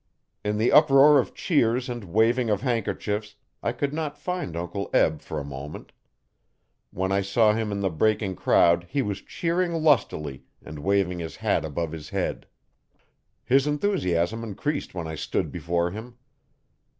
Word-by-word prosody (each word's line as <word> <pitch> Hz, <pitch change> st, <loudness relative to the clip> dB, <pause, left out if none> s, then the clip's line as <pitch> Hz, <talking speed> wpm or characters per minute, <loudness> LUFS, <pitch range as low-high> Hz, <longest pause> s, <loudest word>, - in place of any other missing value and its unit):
In 105 Hz, 0 st, -1 dB
the 110 Hz, +3 st, +2 dB
uproar 145 Hz, -1 st, +7 dB
of 125 Hz, -, -2 dB
cheers 125 Hz, -6 st, +1 dB
and 120 Hz, -4 st, -5 dB
waving 115 Hz, +6 st, +2 dB
of 105 Hz, -2 st, +1 dB
handkerchiefs 105 Hz, -4 st, -2 dB, 0.3 s
I -, -, 0 dB
could 140 Hz, +4 st, -2 dB
not 155 Hz, -2 st, -3 dB
find 180 Hz, -, -4 dB
Uncle 90 Hz, +4 st, -4 dB
Eb 80 Hz, -1 st, +3 dB
for 80 Hz, -, -5 dB
a -, -, -5 dB
moment. 70 Hz, +2 st, -8 dB, 1.0 s
When 95 Hz, +1 st, -2 dB
I 100 Hz, 0 st, +2 dB
saw 105 Hz, +3 st, +3 dB
him 110 Hz, -1 st, -2 dB
in 100 Hz, 0 st, -2 dB
the 95 Hz, -2 st, 0 dB
breaking 105 Hz, +3 st, +1 dB
crowd 85 Hz, +2 st, +3 dB
he 140 Hz, -1 st, 0 dB
was 100 Hz, -1 st, -3 dB
cheering 170 Hz, +1 st, -1 dB
lustily 115 Hz, -, +1 dB, 0.2 s
and 75 Hz, -1 st, -8 dB
waving 95 Hz, +1 st, +1 dB
his 80 Hz, -1 st, -6 dB
hat -, -, 0 dB
above 80 Hz, +1 st, -3 dB
his 80 Hz, -2 st, -8 dB
head. -, -, -3 dB, 1.0 s
His 135 Hz, +2 st, +3 dB
enthusiasm 115 Hz, -, 0 dB
increased 140 Hz, +4 st, -3 dB
when 85 Hz, -2 st, -4 dB
I 80 Hz, -, -5 dB
stood 80 Hz, -, -2 dB
before 85 Hz, +1 st, -1 dB
him. 115 Hz, +5 st, -8 dB
105 Hz, 160 wpm, -25 LUFS, 85-130 Hz, 1.0 s, uproar